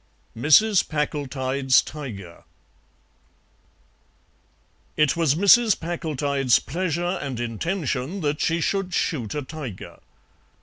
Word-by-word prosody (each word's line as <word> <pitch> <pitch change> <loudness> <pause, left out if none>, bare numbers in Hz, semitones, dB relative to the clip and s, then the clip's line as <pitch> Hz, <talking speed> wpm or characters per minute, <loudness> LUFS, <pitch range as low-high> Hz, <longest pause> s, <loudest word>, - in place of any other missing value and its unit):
MRS. 175 - +4
PACKLETIDE'S 140 -3 0
TIGER 105 - -9 2.5
It 150 -3 +3
was 165 -4 +2
Mrs. 205 +4 +5
Packletide's 145 -6 0
pleasure 175 +3 -2
and 135 -4 -5
intention 140 - -3
that 150 -1 -1
she 165 +1 0
should 190 +1 -1
shoot 125 - -2
a 145 - -3
tiger. 130 - -8
150 Hz, 90 wpm, -23 LUFS, 130-175 Hz, 2.5 s, Mrs